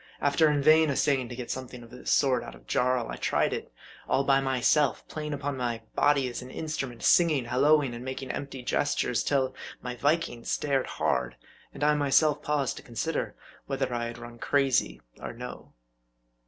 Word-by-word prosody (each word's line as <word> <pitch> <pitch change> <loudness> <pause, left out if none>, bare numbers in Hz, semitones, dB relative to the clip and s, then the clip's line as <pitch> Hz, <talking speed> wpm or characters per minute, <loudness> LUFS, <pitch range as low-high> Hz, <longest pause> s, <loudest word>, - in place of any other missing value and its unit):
After 145 +2 +3
in 145 -2 +1
vain 155 +1 +6
essaying 135 -2 +1
to 120 - -6
get 120 -1 -5
something 125 -2 -6
of 115 - -15
this 125 - -7
sort 135 -2 +3
out - - -9
of - - -18
Jarl, 125 -2 +1
I - - -5
tried - - +1
it - - -5 0.4
all 135 - +3
by 135 0 +4
myself; 135 +2 +2
playing 150 -1 -5
upon 145 -1 -3
my 120 -3 -3
body 145 -2 +3
as 125 - -5
upon 125 - -9
an - - -10
instrument; 135 -6 -4
singing, 155 -7 +4
halloing, 140 +2 +3
and 120 +1 -7
making 130 0 -4
empty 135 -2 -6
gestures, 125 -2 0
till 135 -2 +1 0.3
my 125 -1 -5
Viking 145 -2 0
stared 140 -3 0
hard; 65 -1 -1 0.4
and - - -6
I 150 0 +5
myself 150 +1 +3
paused 145 -3 -1
to - - -7
consider 130 +7 -3 0.3
whether 135 -2 -2
I 120 -1 -1
had 115 0 -6
run 120 0 -10
crazy 130 - +1 0.2
or - - -6
no. - - -9
135 Hz, 185 wpm, -28 LUFS, 125-145 Hz, 0.4 s, vain